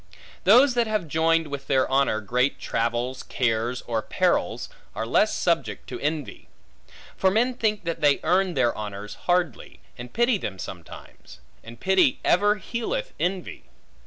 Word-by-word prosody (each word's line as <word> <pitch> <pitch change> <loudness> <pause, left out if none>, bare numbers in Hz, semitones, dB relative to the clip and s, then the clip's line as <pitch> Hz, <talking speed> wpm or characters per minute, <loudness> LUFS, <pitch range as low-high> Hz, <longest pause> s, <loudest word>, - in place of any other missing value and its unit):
Those 250 +7 +6
that 240 -2 +1
have 215 -6 -1
joined 165 +1 +2
with 140 -1 -6
their 135 -2 +2
honor 135 -5 +1
great 125 +6 0
travels, 120 +3 -2
cares, 120 0 -1
or 115 -2 -2
perils, - - 0 0.3
are - - -2
less - - +3
subject - - -1
to - - -6
envy. 150 -1 -4 0.7
For 190 - +3
men 235 +6 +2
think 215 -4 -1
that 170 -1 -4
they 145 -2 +4
earn 180 +1 +2
their 120 - +2
honors 105 0 -6 0.2
hardly, 175 -1 0 0.2
and 120 0 -8
pity 240 -2 +2
them 95 - -5
sometimes; 90 -8 -11 0.2
and 115 +1 -11
pity 190 -6 +3
ever 205 +4 +4
healeth 390 - -4
envy. 180 0 -3
160 Hz, 150 wpm, -25 LUFS, 120-200 Hz, 0.7 s, Those